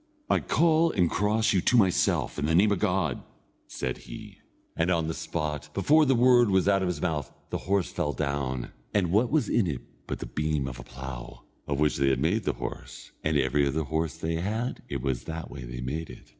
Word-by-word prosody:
"I - - +4
call 165 0 +3
and 90 -3 +2
cross 110 +2 +2
you 95 - +3
to 125 - +3
myself, 95 -6 +2
in 75 - 0
the 80 - +2
name 105 +4 +5
of 100 - +1
God!" 90 - 0 0.5
said 65 - -3
he; - - -10 0.4
and 85 +2 +1
on 85 -3 +1
the 80 - -2
spot, 75 -2 -4
before 150 +9 +4
the 135 - +4
word 120 -1 +5
was 95 -1 +3
out 100 -1 +4
of 95 - 0
his 90 - -2
mouth, 80 -6 -1 0.2
the - - -1
horse 100 -2 +1
fell 85 -6 -1
down, 70 -2 -2 0.2
and 90 -5 +2
what 110 +5 +3
was 155 -1 +2
in 110 -6 +2
it 70 -6 -3 0.3
but - - -3
the - - -6
beam 75 -2 -1
of 65 -2 -7
a - - -8
plough, 60 -1 -8 0.2
of 70 -1 -1
which 75 0 +2
they 70 -1 +3
had 65 -1 +1
made 95 +9 0
a - - +2
horse; - - -7
and 80 -1 +2
every 70 +1 +2
other 75 +4 0
horse 80 +2 -2
they 80 0 -2
had, 110 +8 -2
it 70 -3 -3
was 65 -3 -2
that 80 0 -6
way 65 -3 -7
they 60 +1 -6
made 75 +6 -4
it. 60 - -13
80 Hz, 225 wpm, -27 LUFS, 70-100 Hz, 0.5 s, name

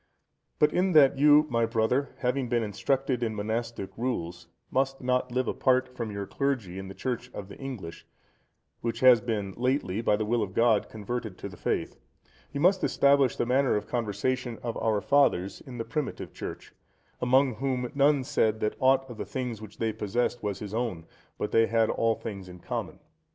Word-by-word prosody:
But 150 0 +3
in 185 +1 +2
that 140 -3 +6
you, 150 +1 +7
my 115 -1 +2
brother, 115 +4 +1
having 125 0 0
been 120 -1 +1
instructed 130 +5 -1
in 110 -2 -1
monastic 110 0 -3
rules, 90 -8 -3 0.2
must 135 0 0
not 125 0 0
live 125 0 0
apart 130 -1 +1
from 115 -3 -4
your 100 -1 -4
clergy 115 -9 -2
in 95 - -7
the 95 - -9
Church 125 -1 -3
of 100 -1 -7
the - - -10
English, 120 -12 -7 0.7
which 115 0 -3
has 125 -3 +7
been 105 -4 -2
lately, 125 -5 0
by 105 - +3
the 110 +1 -2
will 115 +2 +1
of 95 -3 -4
God, 115 -2 +3
converted 110 -1 -5
to - - -6
the - - -11
faith, - - -2 0.5
you 140 - -4
must 185 +5 +3
establish 140 -2 +3
the - - 0
manner 130 +2 +2
of 105 - -1
conversation 120 +2 -2
of 115 -2 -3
our 110 -2 +1
fathers 100 -10 +2
in 125 -2 -8
the 115 - -3
primitive 150 -3 -4
Church, - - -8 0.5
among 130 -1 +3
whom, 130 -1 -2
none 140 0 +3
said 110 -3 +1
that 105 - 0
aught 135 0 +3
of 120 -3 -9
the - - -1
things 125 -5 -4
which 110 -1 -11
they 110 -1 -1
possessed 120 +3 -1
was 105 -2 -2
his 105 0 -7
own, 110 -8 -2 0.3
but - - -3
they 115 0 +4
had 115 -1 +2
all 115 -1 +1
things 100 -5 -7
common. - - -4
120 Hz, 190 wpm, -28 LUFS, 110-130 Hz, 0.7 s, you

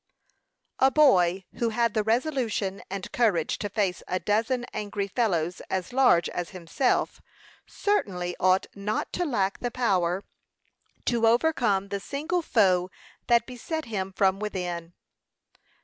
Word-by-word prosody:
A 265 - +6
boy 190 - +4
who 235 - +1
had 230 0 +1
the 215 - +2
resolution 225 -4 -1
and 195 0 -5
courage 200 -10 +1
to 205 - -3
face 195 -3 -1
a 185 - -1
dozen 225 +7 0
angry 205 -1 -3
fellows 180 -6 0
as 190 +4 -3
large 250 -10 +4
as 175 -1 -4
himself, 185 +8 -1 0.5
certainly 185 - -1
ought 185 +1 +3
not 205 +2 -3
to 355 - 0
lack 200 - 0
the 245 - -2
power 190 -6 0 0.8
to 230 -2 +2
overcome 230 -6 +2
the 200 0 -2
single 310 - -2
foe 185 - +2 0.4
that 235 -1 +4
beset 305 +6 -5
him 195 -4 -3
from 190 0 +2
within. 175 -5 -4
205 Hz, 135 wpm, -26 LUFS, 185-245 Hz, 0.8 s, A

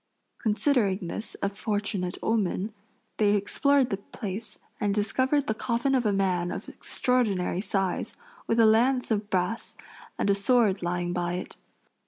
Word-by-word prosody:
Considering 215 - +1
this 215 - -4
a 200 - +2
fortunate 200 -3 -2
omen, 210 -1 0 0.4
they 210 -1 +4
explored 265 +6 +2
the 195 - 0
place 210 +1 -4 0.2
and 205 -1 +1
discovered 260 +7 +1
the 220 - 0
coffin 240 +4 0
of 250 -4 +2
a - - +3
man 185 -3 +1
of - - -5
extraordinary 205 -8 0
size, 195 -3 -1 0.3
with 230 - +2
a 225 - +7
lance 245 +4 +3
of 210 -1 0
brass 185 +4 -1 0.4
and - - 0
a - - +5
sword 205 -1 +3
lying 175 0 -1
by 175 -1 -1
it. 180 - -5
210 Hz, 150 wpm, -27 LUFS, 190-230 Hz, 0.4 s, a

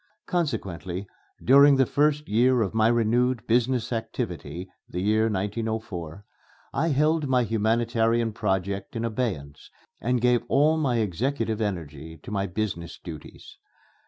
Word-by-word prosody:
Consequently, 100 - -3 0.4
during 140 +2 +7
the 135 0 +4
first 150 +3 +1
year 120 +3 +3
of 100 - -3
my 110 0 +3
renewed 120 +1 +2
business 120 0 +1
activity 90 - -4 0.2
(the 90 - -4
year 110 +3 +2
1904), 105 -4 -3 0.5
I 165 - +1
held 155 +1 +2
my 125 -2 +3
humanitarian 115 +1 +1
project 100 -1 -2
in 115 0 -2
abeyance 105 - -4 0.3
and 125 +2 0
gave 125 0 +3
all 150 +3 +3
my 135 -6 +1
executive 115 - -1
energy 80 -6 -4
to - - -9
my 100 -1 -1
business 90 -3 -4
duties. 80 -4 -11
110 Hz, 130 wpm, -26 LUFS, 95-125 Hz, 0.5 s, during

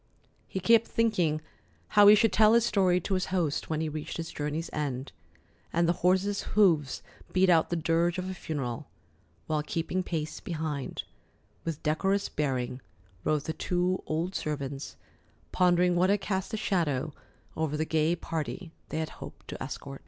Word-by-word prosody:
He 190 - -3
kept 230 +4 +5
thinking 180 -10 +1 0.5
how 205 -1 +7
he 210 - +10
should 225 +1 +3
tell 215 0 +6
his 235 0 +5
story 185 -5 +3
to 195 - -2
his 185 -1 0
host 170 -6 -1
when 155 -1 0
he 160 - -1
reached 155 0 -5
his 165 -1 -5
journey's 150 +3 -3
end, 140 -3 -3 0.6
and 170 0 +2
the 170 - +4
horses' 190 +3 +2 0.2
hoofs 160 -10 +3 0.3
beat 185 0 +4
out 165 -2 +4
the 175 - 0
dirge 165 +2 +1
of 185 0 -3
a 190 - -3
funeral; 140 -9 -4 0.6
while 155 -1 0
keeping 165 +4 -2
pace 160 -4 -3
behind, 155 -5 -4 0.6
with 165 -3 -4
decorous 195 +6 +1
bearing, 130 -3 -2 0.4
rode 155 -2 +1
the 160 - -3
two 180 +2 0
old 165 +4 -1
servants, 140 -4 -4 0.6
pondering 180 0 +3
what 180 +2 +3
had 205 +1 +3
cast 190 0 -2
a 220 - -2
shadow 155 -8 0 0.4
over 155 -1 -1
the 155 - 0
gay 160 +1 +2
party 165 +1 -4 0.2
they - - -3
had 160 0 -2
hoped - - -10
to - - -5
escort. 140 0 -7
165 Hz, 165 wpm, -29 LUFS, 150-185 Hz, 0.6 s, he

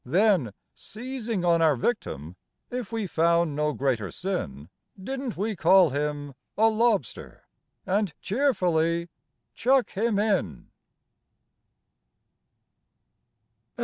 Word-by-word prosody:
Then, 175 - +2 0.2
seizing 230 -4 -5
on 170 -1 +3
our 155 -3 +4
victim, 90 - -3 0.4
if 245 -3 -4
we 225 -2 -2
found 170 -2 +2
no 150 +1 +1
greater 125 -5 -1
sin, 80 - -4 0.3
Didn't 260 +2 -5
we 210 +3 -1
call 180 -2 +5
him 145 0 -3 0.2
"a 220 +1 +5
lobster," 220 - -1 0.4
and 200 -1 0
cheerfully 175 - +1 0.4
chuck 260 +1 +2
him 215 +1 0
in? 195 - -1
185 Hz, 95 wpm, -26 LUFS, 150-220 Hz, 0.4 s, call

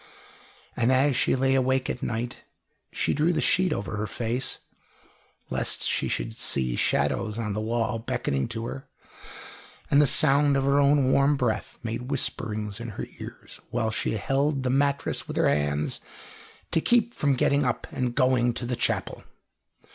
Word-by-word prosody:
And 120 +1 +2
as 135 +1 +3
she 125 - +2
lay 135 0 +2
awake 130 0 +1
at 125 - -4
night, 120 +1 -3 0.5
she - - 0
drew 155 +4 +2
the 175 - 0
sheet 185 -2 +2
over 105 -5 -3
her 105 +1 -2
face, 120 +4 -2 0.9
lest - - +1
she - - 0
should - - -3
see 65 -3 +1
shadows 105 - 0
on 110 -3 -2
the 105 - -2
wall 115 +1 -1
beckoning 70 -10 -2
to 115 0 -5
her; 130 +3 -7 1.0
and 140 - +6
the 145 - +4
sound 140 0 +4
of 135 - +1
her 140 +1 +3
own 140 -2 +4
warm 140 +2 +3
breath 120 -4 -2
made 115 +2 -4
whisperings 110 -6 -2
in 115 0 -6
her - - -3
ears, - - -10
while 115 -2 -1
she 110 - -1
held 135 +5 0
the 125 - 0
mattress 140 +1 0
with - - -5
her - - +3
hands, 75 0 0 0.7
to 165 - +2
keep 240 +2 +2
from 140 -2 +1
getting 140 +3 +2
up 125 -3 -1
and 125 -2 -2
going 125 -2 +2
to 120 - -4
the 125 +1 -1
chapel. 120 - -2
125 Hz, 170 wpm, -26 LUFS, 115-140 Hz, 1.0 s, and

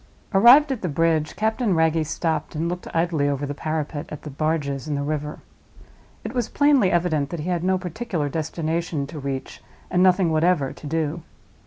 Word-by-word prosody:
Arrived 250 +9 +7
at 255 - -3
the 180 - -2
bridge, 155 0 +1
Captain 220 -2 0
Wragge 160 0 +2
stopped 160 -1 -2
and 160 +2 -1
looked 180 +1 -4
idly 165 -4 +1
over 140 0 -2
the 145 - -4
parapet 155 0 -3
at 150 - -8
the 150 - -7
barges 145 -1 -2
in 150 - -1
the 140 - -2
river. 150 0 -3 0.8
It - - -5
was 245 -3 -1
plainly 285 -10 +3
evident 160 -5 +1
that 170 0 -5
he 170 - -4
had 175 -2 -1
no 190 +1 +2
particular 180 -3 -3
destination 160 0 -2
to 150 +2 -8
reach 135 -1 -5 0.3
and 180 - +2
nothing 185 -2 +4
whatever 155 -3 +2
to 150 - -10
do. 160 +1 -2
160 Hz, 185 wpm, -23 LUFS, 150-180 Hz, 0.8 s, Arrived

